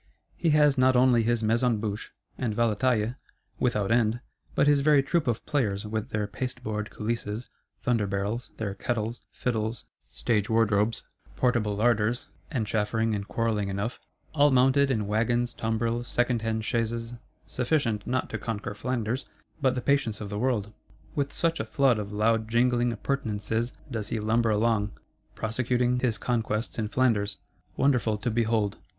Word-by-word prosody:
He 170 - +1
has 150 -3 +4
not 130 0 +5
only 125 -1 +5
his 115 0 +1
Maison 115 +1 +2
Bouche, 105 -1 -4 0.2
and 115 -5 -2
Valetaille 115 +1 +1 0.4
without 105 -4 +1
end, 115 0 +3 0.4
but - - +4
his 145 -1 +5
very 145 -1 +4
Troop 155 +2 0
of 115 -1 -1
Players, 105 -9 0
with 110 +3 -3
their 105 -1 -1
pasteboard 105 -2 -4
coulisses, 115 0 -4 0.3
thunder 115 -4 +1
barrels, 100 +5 -2
their 100 -3 -2
kettles, 115 +1 -2
fiddles, 110 -2 -2 0.2
stage 105 -3 0
wardrobes, 110 -1 +2 0.3
portable 120 -5 +1
larders 115 +1 +1 0.2
(and 125 -8 -1
chaffering 110 +1 0
and 100 -1 -3
quarrelling 110 -3 0
enough); 100 +5 -3 0.3
all 145 -1 +5
mounted 135 +2 +4
in 110 -5 0
wagons, 120 +3 +1
tumbrils, 115 +1 -1
second 120 -1 +1
hand 110 0 -1
chaises,—sufficient 115 +1 -2
not 130 +1 0
to - - -3
conquer 110 -3 -4
Flanders, 120 +3 -2 0.3
but 130 -2 +3
the 125 - -2
patience 140 -6 +1
of 105 -1 -6
the 105 - -3
world. 110 -4 0 0.4
With 140 -1 -1
such 165 0 0
a - - 0
flood 120 +1 +2
of 105 -1 -5
loud 110 +1 +1
jingling 120 +1 +2
appurtenances 115 -2 -2 0.2
does 110 -4 -2
he 115 - -2
lumber 115 +2 +2
along, 105 -1 +1 0.4
prosecuting 125 +2 0
his 120 -4 +1
conquests 115 0 -1
in 110 - 0
Flanders; 110 -4 +1 0.4
wonderful 125 -6 +2
to 120 +3 -2
behold. 110 -3 +1
115 Hz, 150 wpm, -27 LUFS, 105-125 Hz, 0.4 s, not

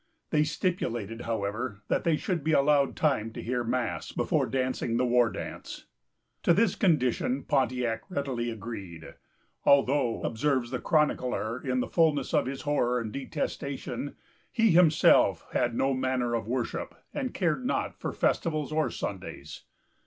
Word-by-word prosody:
They 150 -1 +4
stipulated, 120 - -2
however, 110 0 -3
that - - 0
they 165 -2 +4
should 175 -3 -2
be 160 +1 +1
allowed 140 -1 +3
time 130 -8 +1
to - - -6
hear 120 +1 -1
mass, 120 -1 -2
before - - 0
dancing 130 -2 -1
the 125 - +2
war 120 -1 +4
dance. - - -7 0.6
To 170 - +4
this 210 -2 +3
condition 135 - +1
Pontiac 125 - 0
readily 135 -8 -2
agreed, 100 -7 -7 0.5
"although," 135 -3 +3
observes 130 0 0
the 125 - -2
chronicler 125 -7 0
in 130 -1 0
the - - -2
fulness 155 -5 +2
of - - +2
his 135 0 -5
horror 125 -5 +1
and 110 -2 -4
detestation, 140 +1 -4 0.4
"he 225 -3 +3
himself 165 -2 +5
had 120 -1 0
no 135 +3 +2
manner 130 -2 0
of 115 -3 -2
worship, 125 0 -3 0.2
and 260 -3 -2
cared 175 +5 0
not 255 - -1
for - - -5
festivals 155 -3 0
or 155 0 +1
Sundays." 95 -2 -6
130 Hz, 145 wpm, -28 LUFS, 120-150 Hz, 0.6 s, himself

